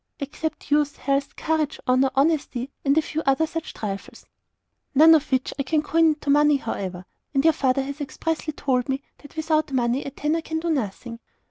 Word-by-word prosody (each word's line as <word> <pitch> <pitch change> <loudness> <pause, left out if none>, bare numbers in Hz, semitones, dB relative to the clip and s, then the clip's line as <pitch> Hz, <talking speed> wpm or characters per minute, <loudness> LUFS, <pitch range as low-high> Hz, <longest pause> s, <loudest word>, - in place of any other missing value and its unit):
"Except 305 +2 -5
youth, 290 -1 +2
health, 275 0 -1
courage, 315 -2 -1
honour, 255 +1 +4
honesty, 275 -3 +1
and 280 +1 +2
a 320 - +4
few 315 - -3
other 275 +4 +2
such 325 0 -5
trifles." 195 -2 -6 0.7
"None 320 +4 +8
of 310 -3 +2
which 260 -1 0
I - - +3
can 300 +3 0
coin 330 +2 +3
into 300 -2 0
money, 295 0 +5
however. 185 -7 -5 0.3
And 270 - +3
your 320 0 +5
father 270 -2 +1
has 280 +2 -6
expressly 320 +2 -3
told 260 -3 -1
me 270 +1 -1 0.2
that 290 - -15
without 310 -2 0
money 250 +1 +1
a - - -5
tanner 300 +4 -1
can 320 0 -3
do 335 +1 -1
nothing." 230 -3 -3
285 Hz, 190 wpm, -24 LUFS, 265-315 Hz, 0.7 s, None